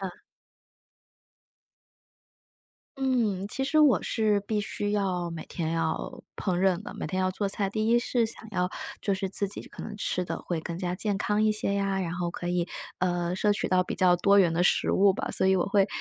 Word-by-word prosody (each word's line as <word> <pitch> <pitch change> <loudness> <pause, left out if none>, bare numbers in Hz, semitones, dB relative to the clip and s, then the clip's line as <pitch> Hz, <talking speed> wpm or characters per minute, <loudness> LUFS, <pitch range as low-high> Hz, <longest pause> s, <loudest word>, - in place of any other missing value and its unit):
嗯。 190 -2 -6 2.8
嗯， 235 -8 0
其 265 - -3
实 310 +3 +2
我 295 -4 +5
是 215 -2 +1
必 210 +1 -1
须 205 0 -3
要， 185 -4 0
每 165 -1 -6
天 160 -2 -3
要 165 - -2
烹 180 -3 -1
饪 190 0 +2
的， - - -8
每 - - -4
天 185 -1 -2
要 185 - +1
做 200 +2 -2
菜。 195 0 -2
第 215 +1 -1
一 235 - +5
是 240 0 +1
想 220 0 -8
要 180 -3 0 0.3
就 200 - 0
是 190 0 -2
自 200 +2 0
己 200 - -4
可 - - -9
能 210 - -7
吃 185 -3 -1
得 - - -4
会 170 -2 -2
更 165 +1 -5
加 180 0 -2
健 205 +1 -1
康 210 +2 +1
一 215 - +4
些 210 -1 -1
呀， 195 -1 0
然 170 -3 -2
后 175 -1 -2
可 175 0 -5
以， 175 -1 0 0.3
呃， 175 -1 0
摄 210 +1 +3
取 205 - -1
到 185 0 +3
比 - - -4
较 180 -1 +4
多 200 +3 +4
元 175 -4 +4
的 170 +2 +1
食 - - +3
物 195 0 +5
吧， - - -3
所 - - +1
以 190 - +5
我 180 - +2
会， 195 0 +3
195 Hz, 230 characters per minute, -27 LUFS, 180-210 Hz, 2.8 s, 我